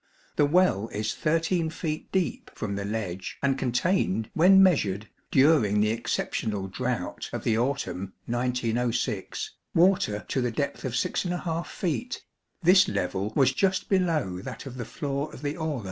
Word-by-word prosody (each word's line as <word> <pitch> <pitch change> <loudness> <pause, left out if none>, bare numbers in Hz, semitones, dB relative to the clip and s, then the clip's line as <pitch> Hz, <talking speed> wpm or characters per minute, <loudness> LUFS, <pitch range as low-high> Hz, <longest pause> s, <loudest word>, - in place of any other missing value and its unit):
The 145 - +4
well 155 - +3
is 110 0 -2
13 165 +1 +1
feet 155 -1 -4
deep 190 -3 -1
from 100 -2 -3
the 100 0 -3
ledge 100 -4 -4
and 135 -1 +3
contained, 135 - 0
when 190 +4 +7
measured, 110 - +2 0.2
during 130 -8 +4
the 105 +1 +3
exceptional 110 -3 -2
drought 95 - -3
of - - -4
the 110 - +2
autumn 95 -8 -2
1906, 120 -3 -1 0.2
water 165 - +3
to 130 - 0
the 125 - +1
depth 140 +5 -3
of 125 -2 -2
6 130 +8 0 0.4
feet; 200 - -3 0.4
this 185 +3 +6
level 95 - -2
was 135 -1 +4
just 190 +6 +1
below 160 - +1
that - - -7
of 130 -2 -8
the 120 - -4
floor 140 +4 -3
of 140 - -11
the 145 +1 -1
aula. 160 -5 -2
130 Hz, 150 wpm, -27 LUFS, 110-165 Hz, 0.4 s, when